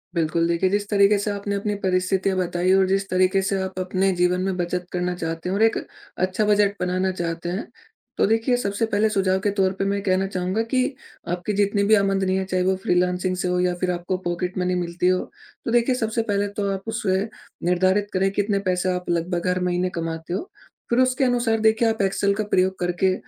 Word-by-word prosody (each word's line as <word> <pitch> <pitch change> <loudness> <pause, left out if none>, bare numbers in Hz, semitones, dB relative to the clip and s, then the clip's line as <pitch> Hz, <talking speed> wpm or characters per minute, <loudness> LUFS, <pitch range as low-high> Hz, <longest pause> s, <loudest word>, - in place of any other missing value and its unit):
बिल्कुल, 165 0 +1
देखिए, 170 +2 +1
जिस 205 +1 -1
तरीके 205 0 +4
से 205 +1 -1
आपने 200 0 -3
अपनी 205 +1 -1
परिस्थितियाँ 185 +1 +1
बताई 180 0 0
और 190 0 +4
जिस 195 +1 0
तरीके 185 +1 +2
से 195 0 -1
आप 190 0 -4
अपने 185 +1 +1
जीवन 180 +1 +2
में 190 0 -1
बचत 180 0 -2
करना 180 0 -1
चाहते 165 +1 -4
हो 190 - -1
और 210 - 0
एक 225 - +3 0.4
अच्छा 185 +3 0
बजट 205 -1 +3
बनाना 185 +1 0
चाहते 170 -1 -4
हैं। 190 +6 -4 0.5
तो - - +3
देखिए, 225 +3 +2
सबसे 205 -1 -1
पहले 215 0 +1
सुझाव 190 -2 +1
के 205 +2 0
तौर 190 -1 +3
पे 195 - +1
मैं 200 +1 0
ये - - -3
कहना 190 0 +1
चाहूँगा 185 +2 -1
कि 255 -1 +3 0.5
आपकी 180 +4 -3
जितनी 200 0 +1
भी - - +9
आमदनी 195 -2 +1
है, 190 - -1
चाहे 185 -1 0
वो 190 +1 +2
फ्रीलांसिंग 180 +1 +1
से 180 0 -2
हो 180 0 0
या 180 0 +1
फिर 180 -1 +1
आपको 175 +1 -2
पॉकेट 180 +2 -2
मनी 180 0 0
मिलती 175 0 -1
हो। 185 0 +3 0.5
तो - - -1
देखिए 240 +2 +3
सबसे 225 -2 -1
पहले 200 0 +1
तो 200 -1 0
आप 195 -1 -3
उसे 190 -4 0 0.4
निर्धारित 185 +3 +2
करें 190 +1 +2
कितने 205 0 0
पैसे 180 0 0
आप 180 0 -5
लगभग 175 +1 -1
हर 180 0 +1
महीने 180 0 0
कमाते 165 0 -4
हो, 360 - -4 0.4
फिर 235 - +2
उसके 255 +1 +2
अनुसार 240 -3 +2
देखिए 220 +1 +3
आप 220 -1 -1
एक्सेल 200 +1 +1
का 215 - -1
प्रयोग 185 +1 +2
करके, 180 +1 +1
190 Hz, 215 wpm, -23 LUFS, 180-205 Hz, 0.5 s, भी